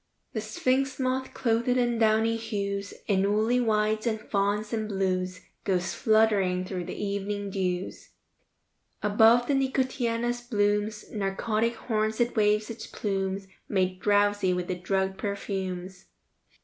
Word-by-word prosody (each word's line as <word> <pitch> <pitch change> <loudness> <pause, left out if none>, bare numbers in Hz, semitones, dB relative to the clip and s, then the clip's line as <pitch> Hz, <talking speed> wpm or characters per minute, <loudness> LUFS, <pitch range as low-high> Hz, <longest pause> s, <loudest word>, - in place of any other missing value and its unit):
III - - -49
The 220 - -2
sphinx 260 +4 0
moth, 260 0 -1
clothed 230 0 +1
in 245 -2 +2
downy 220 0 +3
hues, 200 -3 -3
In 200 -1 +2
woolly 220 +4 +2
whites 215 -1 +1
and 220 -1 0
fawns 210 +1 -1
and 220 -1 -1
blues, 185 -2 -1 0.2
Goes 185 -2 0
fluttering 205 -5 +3
through 185 -2 -4
the - - -6
evening 200 0 -3
dews. 185 -1 -3 0.9
Above 220 +3 +5
the 285 - +1
nicotiana's 245 -3 0
blooms' 210 -2 0
Narcotic 215 +3 0
horns 220 -2 -1
it 240 0 +1
waves 210 0 +2
its 225 -1 -8
plumes, 195 -1 -2 0.2
Made 185 -2 0
drowsy 205 -2 +3
with 180 0 -2
the - - -1
drugged 190 +1 -1
perfumes. 190 -2 -4
210 Hz, 135 wpm, -27 LUFS, 195-230 Hz, 0.9 s, Above